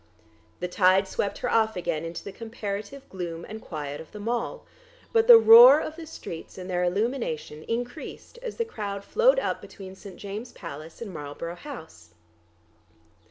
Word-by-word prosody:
The 180 - -1
tide 185 +1 +4
swept 200 - -2
her - - -2
off 220 -1 +3
again 170 -3 -2
into 165 +1 -6
the 200 - -7
comparative 220 +4 -6
gloom 170 -3 -6
and 220 +1 -8
quiet 145 -3 -6
of 160 - -14
the 210 - -9
Mall, 235 - -3 0.5
but 450 0 +4
the 480 -2 +12
roar 465 +2 +10
of 310 - -5
the 325 -1 -9
streets 165 - -8
and 185 -1 -7
their 180 -1 0
illumination 180 - -2
increased 245 - -5
as 475 -3 -6
the 465 - 0
crowd 200 - -5
flowed 485 - +4
up - - -1
between 190 -2 -10
St. 190 -1 -12
James's 210 +4 -7
Palace 160 +3 -8
and 200 -5 -8
Marlborough 150 +2 -6
House. 160 - -11
200 Hz, 165 wpm, -26 LUFS, 175-250 Hz, 0.5 s, the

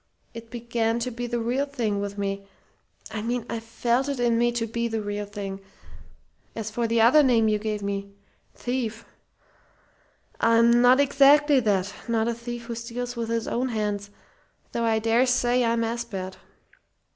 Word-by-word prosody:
It 230 0 -9
began 235 -1 -1
to 245 +2 -2
be 240 +1 -4
the 240 0 -2
real 250 +5 0
thing 230 -8 -2
with 200 0 -4
me. 195 0 -3 0.6
I 215 -1 -4
mean 235 +1 -2
I 230 - -3
felt 235 +4 -1
it 280 -3 -3
in 240 -1 +2
me 240 0 +3
to 235 -1 -1
be 235 +1 -2
the 225 -1 -2
real 205 0 -4
thing. 200 -2 -6 1.0
As 220 -1 -4
for 235 +1 -1
the 230 0 +1
other 240 +7 +7
name 235 -5 +3
you 210 -1 +2
gave 210 -1 -3
me 200 0 -3 0.4
thief 235 -2 -3 1.3
I'm 230 +1 +5
not 250 +2 +6
exactly 285 +1 +5
that 200 -4 0
not 225 -1 +1
a 235 - 0
thief 235 +1 -7
who 235 0 -5
steals 240 +2 -5
with 230 -1 -3
his 230 0 -1
own 255 +2 -1
hands, 210 -3 -2 0.6
though 235 - -1
I 225 -1 +2
dare 230 +3 +2
say 245 0 +2
I'm 230 0 +1
as 235 +1 -2
bad. 190 -4 -6
230 Hz, 175 wpm, -25 LUFS, 215-240 Hz, 1.3 s, other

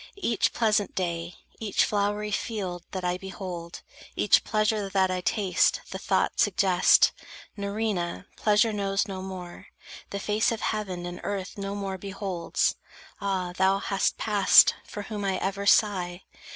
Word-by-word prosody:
Each 235 - +1
pleasant 215 -3 +1
day, 170 -1 -3 0.2
each 215 -3 +1
flowery 205 0 -1
field 195 -5 -3
that 185 -1 -5
I 180 0 -1
Behold, 180 -3 -7 0.3
each 210 - +4
pleasure 215 -2 0
that 190 -1 +2
I 185 0 -2
taste, 190 -2 +1
the - - -5
thought - - 0
Suggest: 190 -5 +4 0.4
"Nerina 200 -3 -2
pleasure 215 +1 +3
knows 200 0 0
no 190 -2 -5
more, 185 -2 -8 0.4
The 200 - -4
face 210 +3 +1
of 225 - -3
heaven 190 -5 -3
and 175 0 -7
earth 195 -2 -4
no 200 0 -4
more 195 -2 -4
beholds." 190 -3 -2 0.4
Ah, 190 -3 -2
thou 190 +1 +3
hast 195 0 0
passed, 205 -3 +6
for 205 - -6
whom 210 0 -5
I 190 -1 0
ever 200 +1 -2
sigh! 185 -4 +2
195 Hz, 145 wpm, -27 LUFS, 185-210 Hz, 0.4 s, passed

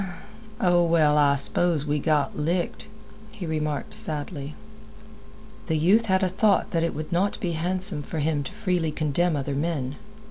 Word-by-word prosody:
"Oh, 175 -2 +3
well, 160 -3 +3
I 145 -1 +4
s'pose 160 +2 +1
we 150 0 0
got 150 -2 +1
licked," 170 +7 -2 0.4
he 210 -5 -7
remarked 155 -2 -2
sadly. 150 -1 -3 1.1
The 160 - +1
youth 200 +9 +3
had 190 0 +2
a - - +3
thought 195 +2 +2
that 165 - +1
it 165 - -1
would 155 +3 -6
not 190 +4 0
be 180 -7 -2
handsome 180 0 0
for 160 - -6
him 150 -1 0
to - - -6
freely 180 -6 -1
condemn 155 +3 0
other 140 0 -2
men. 145 -2 -2
160 Hz, 165 wpm, -25 LUFS, 150-180 Hz, 1.1 s, I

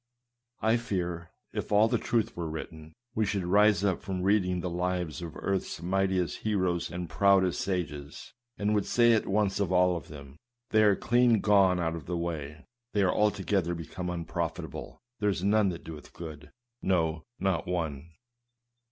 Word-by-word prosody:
I 110 +2 +4
fear, 90 -7 -3 0.2
if - - -4
all 105 +2 +5
the - - +1
truth 115 -2 0
were 85 -2 -3
written, 80 0 -8 0.2
we 110 - +1
should 100 -3 -1
rise 105 +3 +4
up 95 -3 +1
from 95 -1 -3
reading 95 -2 +2
the 90 - -3
lives 90 -2 -2
of 85 -2 -7
earth's 95 -1 -2
mightiest 95 0 0
heroes 95 -5 0
and 90 0 -5
proudest 95 +2 +3
sages, 75 -7 -4 0.2
and 105 +1 0
would 105 -2 +1
say 120 -1 +5
at 110 - +1
once 100 0 +1
of 100 -3 0
all 90 0 +4
of 85 - -6
them, 70 -1 -11
" 120 0 -57
They 110 - +5
are 105 -2 +5
clean 120 0 +3
gone 95 -4 +4
out 80 -1 -1
of 80 -4 -8
the 90 0 -2
way; 75 -4 -5 0.3
they 100 -2 +3
are 90 - +3
altogether 95 -4 +1
become 85 +2 -5
unprofitable; 85 -2 -4 0.2
there 105 - +2
is 95 -2 -2
none 105 0 +3
that 85 -2 -6
doeth 80 -2 -10
good; 80 -3 -9 0.3
no, 80 -4 +1 0.2
not 95 -4 0
one." 80 -4 -3
90 Hz, 175 wpm, -29 LUFS, 85-100 Hz, 0.3 s, all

